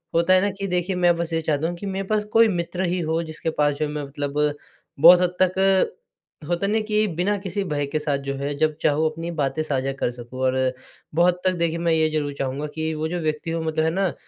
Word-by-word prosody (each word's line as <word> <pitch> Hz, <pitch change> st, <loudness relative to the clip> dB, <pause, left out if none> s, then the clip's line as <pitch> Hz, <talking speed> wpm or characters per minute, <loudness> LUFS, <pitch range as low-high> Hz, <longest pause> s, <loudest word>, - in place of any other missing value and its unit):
होता 170 Hz, +2 st, +4 dB
है 185 Hz, -, +5 dB
ना 205 Hz, -, +1 dB
कि 195 Hz, -, -2 dB
देखिए 180 Hz, +1 st, -1 dB
मैं 175 Hz, -1 st, +3 dB
बस 170 Hz, -1 st, -3 dB
ये 165 Hz, -, +1 dB
चाहता 155 Hz, 0 st, 0 dB
हूँ 175 Hz, -, -4 dB
कि 200 Hz, -, -7 dB
मेरे 195 Hz, 0 st, -3 dB
पास 215 Hz, 0 st, +1 dB
कोई 225 Hz, 0 st, +6 dB
मित्र 180 Hz, -1 st, -2 dB
ही 180 Hz, +1 st, -1 dB
हो 165 Hz, +1 st, +1 dB
जिसके 160 Hz, 0 st, -4 dB
पास 145 Hz, 0 st, +3 dB
जो 155 Hz, -, 0 dB
मैं 150 Hz, 0 st, -4 dB
मतलब 145 Hz, +1 st, -1 dB, 0.5 s
बहुत 175 Hz, +4 st, +9 dB
हद 180 Hz, 0 st, 0 dB
तक 190 Hz, +1 st, +3 dB, 0.6 s
होता 175 Hz, +2 st, 0 dB
है -, -, 0 dB
न -, -, -1 dB
कि 215 Hz, 0 st, +2 dB
बिना 200 Hz, +4 st, +1 dB
किसी 200 Hz, +1 st, -3 dB
भय 150 Hz, -5 st, -2 dB
के 155 Hz, +2 st, -1 dB
साथ 150 Hz, -2 st, 0 dB
जो -, -, 0 dB
है 140 Hz, +1 st, -2 dB
जब 155 Hz, 0 st, +1 dB
चाहूँ 150 Hz, +2 st, +2 dB
अपनी 165 Hz, +2 st, -5 dB
बातें 135 Hz, +3 st, 0 dB
साझा 135 Hz, -3 st, -1 dB
कर 120 Hz, -, 0 dB
सकूँ 120 Hz, +1 st, -10 dB
और 130 Hz, 0 st, +1 dB, 0.6 s
बहुत 175 Hz, +2 st, +4 dB
हद 180 Hz, -, -15 dB
तक 185 Hz, -, -5 dB
देखिए, 170 Hz, 0 st, 0 dB
मैं 170 Hz, 0 st, 0 dB
ये 160 Hz, -1 st, +3 dB
ज़रूर 150 Hz, -2 st, -2 dB
चाहूँगा 135 Hz, +2 st, -2 dB
कि 160 Hz, 0 st, -2 dB
वो 155 Hz, +1 st, -2 dB
जो 175 Hz, +2 st, -3 dB
व्यक्ति 155 Hz, 0 st, -2 dB
वो 165 Hz, -, -1 dB
मतलब 160 Hz, 0 st, 0 dB
है 160 Hz, -, +2 dB
ना, 190 Hz, 0 st, 0 dB
165 Hz, 250 wpm, -23 LUFS, 150-180 Hz, 0.6 s, बहुत